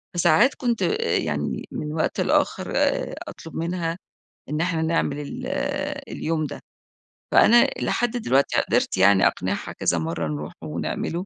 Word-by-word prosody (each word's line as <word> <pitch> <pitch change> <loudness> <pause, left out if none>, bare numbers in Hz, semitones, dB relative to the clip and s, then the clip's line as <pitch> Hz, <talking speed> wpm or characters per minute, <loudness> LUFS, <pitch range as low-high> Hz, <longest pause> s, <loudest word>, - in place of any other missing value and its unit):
فساعات 175 - +4
كنت 240 -3 -1
آآ 450 +2 +1
يعني - - -2
من 150 0 -4
وقت 160 - 0
لآخر - - +1
آآ - - +1
أطلب 165 - -10
منها، 170 0 -2 0.5
إن 150 +2 -1
إحنا 170 -2 0
نعمل 160 -3 0
ال 145 - -6 0.6
اليوم 155 -1 -2
ده، - - -6 0.7
فأنا 240 +1 +6
لحد 240 -1 0
دلوقتي 140 - +2
قدرت - - 0
يعني 95 0 +6
أقنعها 95 +2 -2
كذا 85 - 0
مرة 80 0 -2
نروح 75 +2 -5
ونعمله 80 - -3
155 Hz, 140 wpm, -24 LUFS, -, 0.7 s, فأنا